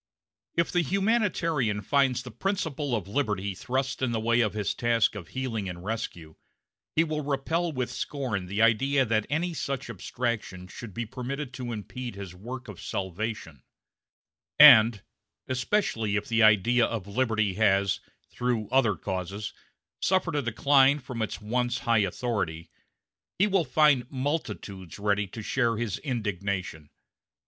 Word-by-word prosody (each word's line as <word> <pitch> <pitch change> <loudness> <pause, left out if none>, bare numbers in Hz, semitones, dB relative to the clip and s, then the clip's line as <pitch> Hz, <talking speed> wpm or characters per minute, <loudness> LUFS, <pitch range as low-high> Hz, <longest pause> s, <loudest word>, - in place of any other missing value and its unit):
If 170 - +1
the 175 - +3
humanitarian 170 - +1
finds 130 -1 +2
the 125 - -9
principle 150 - -2
of 100 -5 -3
liberty 100 -4 -1
thrust 130 +6 -2
in 130 -2 +1
the 115 - 0
way 115 +2 +2
of 105 -2 0
his 105 -2 -1
task 120 -2 +2
of 100 -6 -8
healing 115 -7 -3
and 90 0 -8
rescue, 90 -8 -5 0.6
he 165 - +5
will 155 -2 -2
repel 150 +5 -1
with 125 -4 -3
scorn 125 -8 -3
the 100 +4 +1
idea 135 +5 +3
that 110 -2 0
any 170 +5 0
such 135 -4 -3
abstraction 110 -3 -3
should 100 +2 -10
be 120 - -2
permitted 130 +4 -5
to 125 -2 -5
impede 120 +2 -6
his 100 -3 -7
work 125 +7 -8
of 105 -5 -9
salvation; 95 - -4 1.0
and 110 -2 +9 0.4
especially 125 - 0
if 105 - -1
the 115 -1 +2
idea 110 +3 +5
of 110 -5 -4
liberty 110 -2 0
has, 100 -1 +2 0.3
through 120 -4 -1
other 120 -7 +3
causes, 95 +3 -4 0.5
suffered 185 -3 +1
a 145 - +2
decline 135 +3 +4
from 125 -4 -6
its 110 - -3
once 120 +3 -1
high 115 -2 +2
authority 90 -5 -2 0.7
he 195 - +4
will 195 -4 +2
find 135 -2 +3
multitudes 115 - -4
ready 100 0 0
to 110 +4 -8
share 115 -1 +1
his 110 -4 -2
indignation. 100 - -3
115 Hz, 145 wpm, -27 LUFS, 100-135 Hz, 1.0 s, and